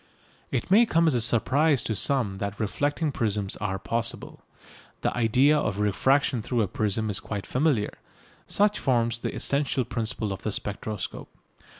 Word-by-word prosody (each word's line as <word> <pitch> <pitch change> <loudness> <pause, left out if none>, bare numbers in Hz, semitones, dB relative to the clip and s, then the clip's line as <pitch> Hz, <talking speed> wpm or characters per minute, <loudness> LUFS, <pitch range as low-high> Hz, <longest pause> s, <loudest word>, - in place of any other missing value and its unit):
It - - -3
may 225 +4 +6
come 170 -3 +3
as 160 - +3
a 120 - +3
surprise 130 +4 +3
to 110 - -2
some 105 -3 0
that 100 0 -4
reflecting 145 +8 -1
prisms 105 -5 -1
are 95 -2 -2
possible. 115 +3 -3 0.6
The - - -1
idea 125 +6 +4
of 105 -9 -1
refraction 125 +5 +2
through 120 +1 0
a - - -1
prism 110 +2 -1
is 100 - 0
quite 100 -3 -5
familiar. 130 -6 0 0.5
Such 205 +1 +2
forms 120 -3 +1
the - - -4
essential 140 -2 0
principle 110 -3 -2
of 95 - -8
the 110 - -2
spectroscope. 105 0 -5
115 Hz, 160 wpm, -26 LUFS, 105-140 Hz, 0.6 s, may